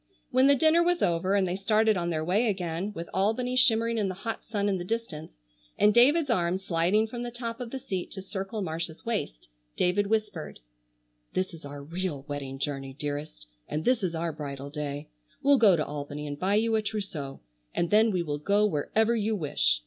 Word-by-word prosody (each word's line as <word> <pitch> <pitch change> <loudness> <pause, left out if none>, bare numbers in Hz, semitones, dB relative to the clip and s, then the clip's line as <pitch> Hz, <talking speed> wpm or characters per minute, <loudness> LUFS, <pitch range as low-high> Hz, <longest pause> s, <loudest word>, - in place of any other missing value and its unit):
When 260 +1 +5
the 280 - +6
dinner 315 +4 +4
was 350 0 +2
over 175 +3 +2
and 195 -2 +3
they 180 - -1
started 215 +2 +3
on 175 -1 -1
their 155 -2 -1
way 205 +8 +2
again, 185 -1 -2
with 170 -3 -6
Albany 225 +7 +1
shimmering 230 -2 +3
in 200 -2 +1
the 185 - -4
hot 225 +4 -5
sun 205 -2 -1
in 195 -2 +1
the - - -3
distance, 180 - -4 0.4
and 210 0 +5
David's 280 +5 +5
arm 175 -4 +1
sliding 190 +3 +2
from 235 +2 -6
the 240 - -3
top 235 -1 -5
of 245 -2 -5
the 270 - -4
seat 190 -8 -4
to 190 - -7
circle 195 +2 -4
Marcia's 160 -1 -5
waist, 210 - -3 0.3
David 200 +3 +2
whispered: 210 -6 -2 0.7
"This 185 -1 -1
is 160 -3 -10
our 145 0 -7
real 165 -2 -4
wedding 140 -2 -5
journey, 135 -1 -4
dearest, 145 - -5 0.2
and 155 - -3
this 250 -2 +3
is 175 -3 -1
our 165 0 -2
bridal 140 -2 -6
day. 145 0 -4 0.4
We'll 280 -1 +5
go 205 -5 +7
to 155 - 0
Albany 145 0 -5
and 145 -1 -5
buy 195 +2 +2
you 225 +1 +2
a 220 - +3
trousseau, 195 -10 -5 0.3
and 170 - -1
then 220 +2 +6
we 180 -4 0
will 145 -2 -3
go 200 +7 +3
wherever 215 +7 +1
you 220 0 0
wish. - - +1
190 Hz, 205 wpm, -28 LUFS, 155-220 Hz, 0.7 s, go